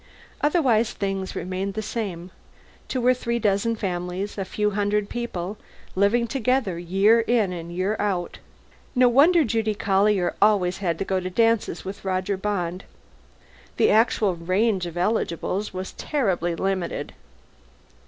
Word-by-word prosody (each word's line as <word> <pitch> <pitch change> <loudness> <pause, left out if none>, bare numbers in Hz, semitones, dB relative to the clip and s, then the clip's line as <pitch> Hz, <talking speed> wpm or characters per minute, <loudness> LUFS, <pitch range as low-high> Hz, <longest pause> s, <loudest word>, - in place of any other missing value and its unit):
Otherwise, 260 -8 +2
things 195 -1 -3
remained 190 +2 -3
the 220 - -1
same. 185 -6 -4 0.6
Two 250 -2 -2
or 255 - +6
three 235 -1 -2
dozen 215 +1 +1
families, 185 0 -3
a 195 - -2
few 210 +2 -1
hundred 205 0 0
people, 210 -5 -4 0.3
living 205 +5 +2
together 250 -6 0
year 195 +6 +3
in 225 -5 +1
and 170 -1 -7
year 185 +4 -1
out. 190 -4 -2 0.6
No 250 0 +5
wonder 310 +7 +5
Judy 220 -3 0
Collier 195 -1 +2
always 195 -4 +3
had 170 -4 -1
to 195 - -3
go 190 -1 0
to 185 0 -4
dances 225 +2 +1
with 195 +2 -7
Roger 190 +1 -1
Bond. 185 -2 -3 0.9
The - - +4
actual 215 -3 +3
range 185 +2 0
of 170 0 -8
eligibles 190 +1 -1
was 185 0 -5
terribly 185 - -1
limited. 190 0 -2
200 Hz, 140 wpm, -24 LUFS, 185-225 Hz, 0.9 s, or